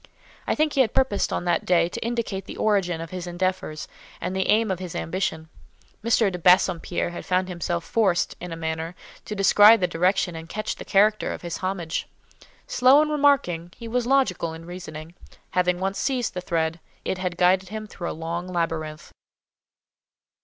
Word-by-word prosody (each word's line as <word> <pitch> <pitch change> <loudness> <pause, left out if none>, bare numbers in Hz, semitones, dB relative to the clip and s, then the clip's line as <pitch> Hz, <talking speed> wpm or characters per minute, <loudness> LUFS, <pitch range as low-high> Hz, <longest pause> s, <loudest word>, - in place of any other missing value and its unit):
I - - +1
think 305 0 +1
he 270 - +4
had 225 -5 0
purposed 260 -7 +1
on - - -2
that 175 -1 +1
day 170 -2 +3
to - - -5
indicate 225 -5 -3
the - - -9
origin 195 -6 +1
of 165 - -7
his 180 -1 -5
endeavours, 175 -3 -2 0.3
and 180 +2 -3
the 190 - 0
aim 215 -1 +3
of 185 - -2
his 180 -3 -6
ambition. 160 -2 -2 0.6
M. 225 -3 +3
de 180 - -5
Bassompierre 175 -1 +3
had 175 - -7
found 185 0 0
himself 175 -1 -3
forced, 190 -5 +1
in 180 0 -6
a - - -4
manner, 160 +1 -4 0.3
to 210 - -5
descry 205 +2 +7
the 185 - +1
direction 180 +1 +1
and 165 0 -8
catch 215 +3 -3
the - - -8
character 210 +2 +3
of - - -7
his 175 - -4
homage. 185 -4 -3 0.6
Slow 255 +3 +5
in 305 - -2
remarking, 275 - +2
he 230 - -8
was 240 +1 -1
logical 195 -12 +1
in 165 +1 -11
reasoning: 165 -2 -8 0.4
having 180 -1 +1
once 195 +1 -2
seized 255 -4 -1
the 180 - -4
thread, 165 -2 -1 0.3
it 190 - -2
had 180 -2 -3
guided 185 +1 +3
him 215 +1 -5
through 180 -4 -6
a - - -6
long 170 +2 -4
labyrinth. 165 -3 -3
180 Hz, 185 wpm, -24 LUFS, 170-210 Hz, 0.6 s, descry